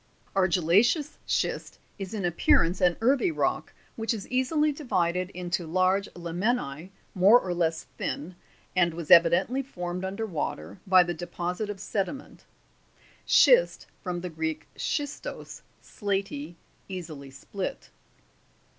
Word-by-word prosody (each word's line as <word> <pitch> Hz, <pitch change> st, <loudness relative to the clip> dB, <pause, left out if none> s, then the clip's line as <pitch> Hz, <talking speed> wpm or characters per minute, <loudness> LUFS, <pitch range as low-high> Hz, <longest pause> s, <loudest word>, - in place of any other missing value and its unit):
20. 185 Hz, -2 st, +2 dB
Argillaceous 240 Hz, -, +3 dB
schist -, -, -1 dB, 0.2 s
is 195 Hz, +2 st, -5 dB
in 200 Hz, -3 st, -2 dB
appearance 175 Hz, +1 st, +2 dB
an 175 Hz, -2 st, +3 dB
earthy 270 Hz, +9 st, +3 dB
rock, 320 Hz, -, -1 dB, 0.2 s
which 225 Hz, 0 st, -1 dB
is 200 Hz, -, -7 dB
easily 300 Hz, +4 st, +2 dB
divided 185 Hz, -, -1 dB
into 175 Hz, -2 st, -3 dB
large 185 Hz, +4 st, +1 dB
laminae 175 Hz, -, -2 dB, 0.2 s
more 200 Hz, +6 st, +6 dB
or 180 Hz, -5 st, -3 dB
less 165 Hz, -2 st, 0 dB, 0.2 s
thin, 175 Hz, +5 st, -4 dB, 0.4 s
and 175 Hz, -2 st, +2 dB
was 165 Hz, -2 st, -6 dB
evi 170 Hz, 0 st, +9 dB
dently 195 Hz, +11 st, +1 dB
formed 180 Hz, -7 st, -5 dB
under 195 Hz, +4 st, -3 dB
water 100 Hz, -, -4 dB
by 185 Hz, -1 st, +7 dB
the 175 Hz, 0 st, -3 dB
deposit 175 Hz, +4 st, -4 dB
of 205 Hz, -2 st, -5 dB
sediment. 210 Hz, +8 st, -4 dB, 0.8 s
[Schist, -, -, +5 dB, 0.2 s
from 180 Hz, -2 st, -4 dB
the 180 Hz, -, -4 dB
Greek 160 Hz, -1 st, -3 dB
schistos, 290 Hz, -1 st, -4 dB, 0.2 s
slaty, 195 Hz, -, -3 dB, 0.3 s
easily 160 Hz, -7 st, -7 dB
split. 185 Hz, +8 st, -6 dB
185 Hz, 130 wpm, -27 LUFS, 170-215 Hz, 0.8 s, evi